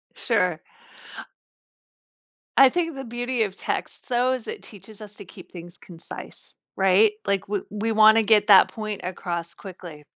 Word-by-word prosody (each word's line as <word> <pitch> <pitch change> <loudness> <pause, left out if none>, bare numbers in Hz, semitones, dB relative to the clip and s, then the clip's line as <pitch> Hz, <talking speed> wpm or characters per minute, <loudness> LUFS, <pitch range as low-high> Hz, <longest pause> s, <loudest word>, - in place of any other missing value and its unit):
Sure. 180 -9 0 2.0
I 270 -1 +8
think 330 -1 -2
the 270 - -6
beauty 240 0 -2
of 195 -2 -4
text, - - -5
though, 250 +1 +2
is 255 -3 -5
it - - -6
teaches 215 +1 -12
us 210 -1 -10
to 200 - -11
keep - - -14
things 175 -1 -9
concise, 170 -2 -8 0.2
right? 195 +3 +4
Like 200 0 -1
we 205 -2 -1
we 215 +2 -2
wanna 220 +1 +6
get 210 -1 +3
that 200 -3 +8
point 215 -2 -6
across 170 -2 -5
quickly. 175 -6 -11
210 Hz, 155 wpm, -24 LUFS, 185-225 Hz, 2.0 s, I